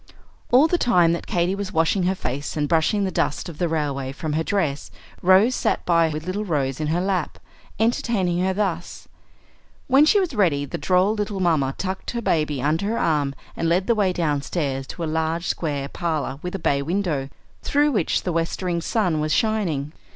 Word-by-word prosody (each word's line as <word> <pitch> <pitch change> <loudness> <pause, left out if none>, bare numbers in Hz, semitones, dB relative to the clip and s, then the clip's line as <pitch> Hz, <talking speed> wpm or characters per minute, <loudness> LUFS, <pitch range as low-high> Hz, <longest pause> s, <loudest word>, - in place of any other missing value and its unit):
All 260 +5 +7
the 345 +2 +1
time 175 -8 +4
that 170 - -4
Katy 175 +1 +1
was 200 -1 -4
washing 165 +3 +1
her 190 +1 +1
face 140 -1 -4
and 145 -1 0
brushing 170 +6 +2
the 190 - -1
dust 160 - -1
of 165 -3 -9
the 175 - +1
railway 145 -4 -2
from 150 +2 -4
her 160 - +1
dress, 160 -7 -1 0.3
Rose 190 +7 +5
sat - - -1
by 170 -2 +3
with 155 0 -4
the - - -12
little 205 +3 -2
Rose 140 -8 -1
in 155 - -1
her 165 +3 +1
lap, 185 -3 -1 0.4
entertaining 205 -6 +1
her 190 - +1
thus. 185 -4 -3 0.8
When 275 +3 +5
she 405 +6 +4
was 365 -6 -1
ready, 165 - +2
the - - -5
droll 185 +3 +2
little 205 -2 -3
mamma 155 -7 +1
tucked 190 0 -4
her - - -1
baby 150 -7 0
under 160 +7 +1
her 230 +2 -1
arm 145 -4 +1 0.2
and 165 - -1
led 180 +3 +2
the 235 - +3
way 205 -4 +2
downstairs 145 -4 -2
to 170 - -6
a - - 0
large 160 +2 -1
square 145 -4 -2
parlor 155 -4 -3
with 180 +1 -5
a - - -1
bay 140 -6 +1
window, 160 -4 -1 0.3
through 295 +1 +2
which 205 - 0
the 180 - -2
westering 170 +1 -1
sun 180 -6 0
was 155 0 -1
shining. 170 -9 0
170 Hz, 200 wpm, -23 LUFS, 150-195 Hz, 0.8 s, All